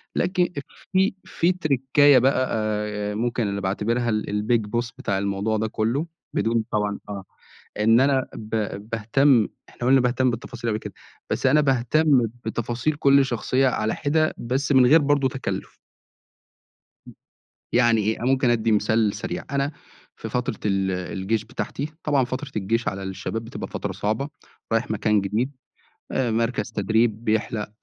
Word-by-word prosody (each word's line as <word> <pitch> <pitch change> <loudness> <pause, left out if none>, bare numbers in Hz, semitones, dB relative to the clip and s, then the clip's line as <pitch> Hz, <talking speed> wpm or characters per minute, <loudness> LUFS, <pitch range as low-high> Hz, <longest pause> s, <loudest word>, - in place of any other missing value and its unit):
لكِ 180 +1 0
أف 175 -5 -1 0.3
في 190 +1 +3
في 170 +2 +1
تركّاية 145 -4 +4
بقى 130 0 +2
آآ 105 -1 -2
آآ - - -5
ممكن 120 0 -1
اللي 100 0 -3
باعتبرها 115 +5 0
ال 110 -1 0 0.2
الbig 115 -3 +1
boss 120 +1 -2
بتاع 100 -2 -1
الموضوع 100 +2 -1
ده 110 +1 0
كلّه 115 +8 -1 0.3
بدون 115 0 +1
طبعًا 105 -1 -1
آه 100 -1 -5 0.6
إن 115 +3 +5
أنا 135 -1 +2
ب 110 -1 -9 0.4
باهتم 115 +2 +3 0.2
إحنا 120 - -4
قُلنا 135 0 +6
باهتم 125 +1 +2
بالتفاصيل 120 0 -5
أوي 110 -1 -1
كده، 105 -2 -8 0.4
بس - - -1
أنا 145 +3 +5
باهتم 135 0 +3 0.2
بتفاصيل 120 +5 -1
كل 140 -1 +4
شخصية 130 +2 +1
على 110 -3 0
حِدا 155 +2 +1
بس 130 +4 -1
من 130 -2 +6
غير 155 +5 +6
برضه 140 -1 +2
تكلّف. 135 0 -5 1.3
امم، - - -13 0.6
يعني 120 -2 +4
إيه، 110 +2 -1
أنا - - -3
مُمكن 130 -2 +2
ادّي 115 -1 +2
مثال 105 0 +2
سريع، 90 - -4
أنا 140 +1 0 0.4
في - - -7
فترة - - -1
ال 95 -2 +1
الجيش 95 +4 -2
بتاعتي 140 +5 -5
طبعًا 140 -4 +2
فترة 130 +3 -5
الجيش 110 +3 -1
على 100 -1 -2
الشباب 95 +4 -4
بتبقى - - -6
فترة - - -4
صعبة، 110 +7 -2 0.4
رايح 115 0 0
مكان 105 0 +2
جديد 110 +7 -1 0.6
آآ 120 -3 0
مركز 115 +2 -1
تدريب 110 +2 +1
بيحلق 110 -1 -1
115 Hz, 155 wpm, -24 LUFS, 105-135 Hz, 1.3 s, قُلنا